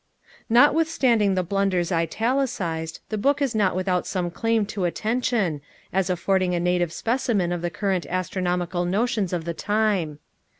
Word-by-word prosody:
Notwithstanding 245 -5 +4
the 185 - +1
blunders 185 -1 0
italicized, 170 - -1
the 215 - -2
book 280 +6 +2
is 275 -4 0
not 205 -5 +2
without 185 -1 0
some 180 -2 -2
claim 225 +2 +1
to 195 -2 -3
attention, 215 - 0 0.3
as 190 -1 +1
affording 180 0 +1
a - - 0
naive 175 -1 +1
specimen 225 -5 0
of 175 -1 -2
the 175 - -1
current 190 0 -1
astronomical 180 -1 -1
notions 205 +1 0
of 170 -3 -2
the 170 - -2
time. 205 -6 0
190 Hz, 145 wpm, -24 LUFS, 175-220 Hz, 0.3 s, Notwithstanding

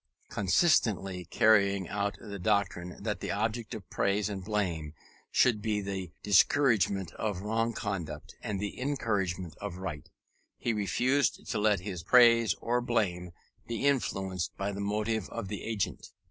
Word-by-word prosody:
Consistently 95 - +2
carrying 100 -4 +3
out 100 0 -2
the 100 -3 -7
doctrine 90 -2 0
that 105 -1 -2
the - - -5
object 110 +2 -2
of 105 -4 -9
praise 100 +1 +1
and 95 -2 -5
blame 85 -8 -2 0.3
should 115 -4 +3
be 105 -1 0
the 95 -3 -4
discouragement 100 - +3
of 105 -4 -3
wrong 115 +2 0
conduct 85 -8 -5
and 105 -4 -3
the 105 +5 -4
encouragement 95 - -1
of 100 -3 -6
right, 90 -6 -6 0.5
he 115 - -1
refused 120 +8 +1
to 115 - 0
let 105 -3 +3
his 90 -3 -5
praise 115 0 +6
or 120 +1 0
blame 100 -7 0 0.4
be 120 +3 -2
influenced 95 -10 0
by 100 +1 -2
the 100 0 -5
motive 105 +1 -1
of 115 -5 -5
the 105 -2 -4
agent. 110 -4 -3
100 Hz, 145 wpm, -30 LUFS, 95-110 Hz, 0.5 s, praise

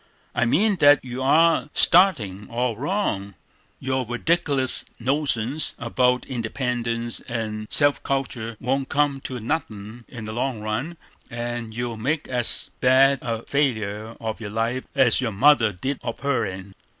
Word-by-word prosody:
"I - - +1
mean 195 - +2
that 145 -3 +5
you 125 +1 -5
are 160 +4 +3
startin' 115 - +3
all 120 0 -1
wrong; 115 - -2 0.4
your 130 0 -1
redic'lus 135 +2 +1 0.2
notions 135 +1 -1
about 125 +1 +1
independence 120 -1 -2
and 110 -2 -4
self 145 -1 +4
cultur 120 -5 -3
won't 135 +2 -1
come 145 -2 +1
to 125 -2 -4
nothin' 110 -4 -5
in 115 -3 -8
the 110 - -6
long 125 0 -2
run, 110 +11 -4 0.3
and 120 -1 -5
you'll 120 -1 -3
make 145 +8 -2
as 125 -2 -1
bad 135 +1 +4
a 115 -1 -3
failure 110 -6 -1
of 110 0 -5
your 105 - -5
life 115 +4 -2
as 130 -2 +4
your 120 -3 -1
mother 115 +1 +4
did 130 +9 -4
of - - -5
her'n." 100 -8 -2
125 Hz, 140 wpm, -23 LUFS, 115-140 Hz, 0.4 s, that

